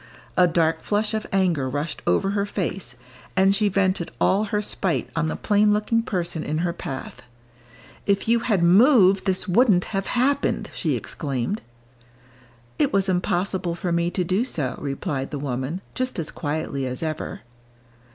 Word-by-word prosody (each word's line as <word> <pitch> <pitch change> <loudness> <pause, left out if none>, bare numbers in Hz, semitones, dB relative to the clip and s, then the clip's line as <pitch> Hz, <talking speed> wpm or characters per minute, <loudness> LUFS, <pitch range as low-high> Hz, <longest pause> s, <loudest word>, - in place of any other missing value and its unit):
A 180 -1 +5
dark 165 -1 +1
flush 210 +1 0
of 220 -1 -2
anger 175 -9 +1
rushed 145 +4 -3
over 195 0 +2
her 200 0 0
face, 180 - -4 0.4
and 195 +1 +4
she 210 0 +2
vented 185 -2 0
all 205 +3 +3
her 210 0 -1
spite 195 -4 -1
on 165 0 +1
the - - -2
plain 210 0 +3
looking 215 +2 +1
person 175 -6 -2
in 155 - -2
her 170 - -1
path. 135 -6 -7 0.9
"If 200 +1 +1
you 235 +1 +4
had 215 -7 +1
moved, 195 +1 +6
this 190 +1 +1
wouldn't 190 -2 +4
have 195 0 -1
happened!" 275 +3 0
she - - -1
exclaimed. 140 - -3 1.2
"It - - +3
was 195 0 +2
impossible 180 0 0
for 175 0 -3
me 170 0 +1
to 180 +1 -1
do 185 +6 +1
so," 145 - -2
replied 140 -1 -3
the 150 - -4
woman, 135 +5 -3
just 255 0 -2
as 165 -3 -3
quietly 145 -3 -3
as 125 +4 -4
ever. 155 -1 -4
185 Hz, 160 wpm, -24 LUFS, 160-205 Hz, 1.2 s, moved